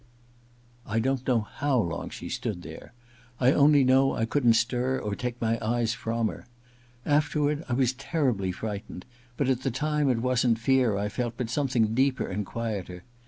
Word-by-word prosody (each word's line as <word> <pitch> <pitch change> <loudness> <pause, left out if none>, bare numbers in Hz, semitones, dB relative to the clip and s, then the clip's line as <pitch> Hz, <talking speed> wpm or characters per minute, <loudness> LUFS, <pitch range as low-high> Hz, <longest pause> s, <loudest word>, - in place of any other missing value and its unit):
I 110 -1 -3
don't 130 +2 -1
know 120 -4 +3
how 135 +5 -1
long 85 -6 -2
she - - -8
stood 90 -5 -4
there. 80 +7 -10 0.5
I 130 0 +5
only 145 0 +5
know 130 +1 +4
I 115 - 0
couldn't 120 -1 +3
stir 125 +3 +1
or 105 -4 -3
take 120 +3 -4
my 115 0 0
eyes 115 +1 0
from 115 0 -1
her. - - -8 0.6
Afterward 150 0 +1
I - - 0
was 125 0 +2
terribly 130 - -1
frightened, 100 -1 -6 0.3
but 140 - 0
at 130 -1 +1
the 135 - 0
time 150 +3 0
it 125 - +2
wasn't 125 -2 +2
fear 120 -3 +2
I 100 +1 -1
felt, 120 +2 -3
but 120 -3 -3
some 145 +1 0
thing 115 -4 +1
deeper 130 +2 +1
and 100 +1 -4
quieter. 100 -6 -5
120 Hz, 180 wpm, -27 LUFS, 110-135 Hz, 0.6 s, I